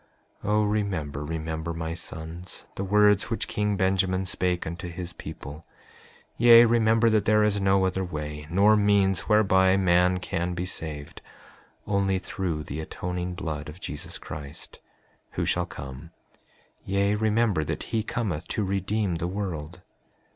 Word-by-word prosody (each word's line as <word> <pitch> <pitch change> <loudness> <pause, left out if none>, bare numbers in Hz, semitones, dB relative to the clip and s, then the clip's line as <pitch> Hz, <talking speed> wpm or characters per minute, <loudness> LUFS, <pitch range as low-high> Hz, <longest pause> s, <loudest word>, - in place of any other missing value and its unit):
5:9 - - -3
O 105 0 +3
remember, 95 -9 -1
remember, 80 +1 -4
my 80 0 -3
sons, 80 +1 -7
the 100 - -4
words 105 0 +4
which 115 - -2
king 105 -1 -1
Benjamin 95 0 +1
spake 90 -1 -1
unto 85 +3 -5
his 85 +1 -6
people; 75 +4 -9 0.7
yea, 120 0 +8
remember 115 0 +3
that 105 -2 +2
there 105 0 +4
is 105 -1 +1
no 95 -1 +3
other 95 0 0
way 75 -3 -5
nor 100 +5 +5
means 100 -2 +2
whereby 95 -3 +4
man 90 -1 +3
can 90 -1 -3
be 90 +1 -2
saved, 75 -5 -6 0.6
only 100 -2 +1
through 90 -4 -3
the 70 +1 -6
atoning 90 +2 -4
blood 75 -4 -4
of 80 +4 -10
Jesus 75 -6 -5
Christ, 75 -1 -9 0.5
who - - -1
shall 90 0 0
come, 70 +1 -9 0.7
yea, 100 +1 +1
remember 110 -4 +2
that - - -3
he 110 - +2
cometh 105 -8 -3
to 105 - -1
redeem 100 -1 -1
the 85 - -2
world. 90 -3 -5
95 Hz, 145 wpm, -26 LUFS, 80-105 Hz, 0.7 s, yea